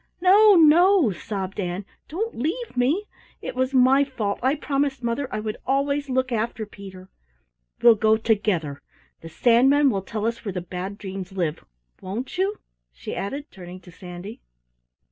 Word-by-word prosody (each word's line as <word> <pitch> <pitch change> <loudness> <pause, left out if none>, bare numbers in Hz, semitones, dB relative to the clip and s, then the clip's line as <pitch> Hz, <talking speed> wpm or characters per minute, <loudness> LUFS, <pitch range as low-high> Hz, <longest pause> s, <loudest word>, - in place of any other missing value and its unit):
"No, 400 +3 +6
no," 335 - +5
sobbed 195 +2 -5
Ann. 180 +1 -3 0.2
"Don't 435 +9 -3
leave 340 - -3
me. 280 +12 +1 0.3
It - - -6
was 260 +1 -1
my 265 +1 +5
fault 225 -7 -3
I 260 +4 +2
promised 275 -2 -2
mother 235 +3 -2
I - - -2
would 215 0 -4
always 280 +1 0
look 260 0 0
after 225 -1 -2
Peter. 190 -2 -12 0.8
We'll 235 -1 +9
go 220 0 +3
together. 195 -10 -1 0.4
The 165 - -9
Sandman 260 - +4
will 195 -3 -2
tell 210 +3 -4
us 230 0 -2
where 200 -4 -4
the 180 - -3
Bad 180 +3 -6
Dreams 190 -2 -7
live, 170 -4 -2 0.4
won't 230 - -5
you?" 395 +3 0 0.3
she - - -7
added, 275 - -5
turning 180 -1 -10
to 180 - -15
Sandy. 180 +4 -10
230 Hz, 160 wpm, -24 LUFS, 195-280 Hz, 0.8 s, We'll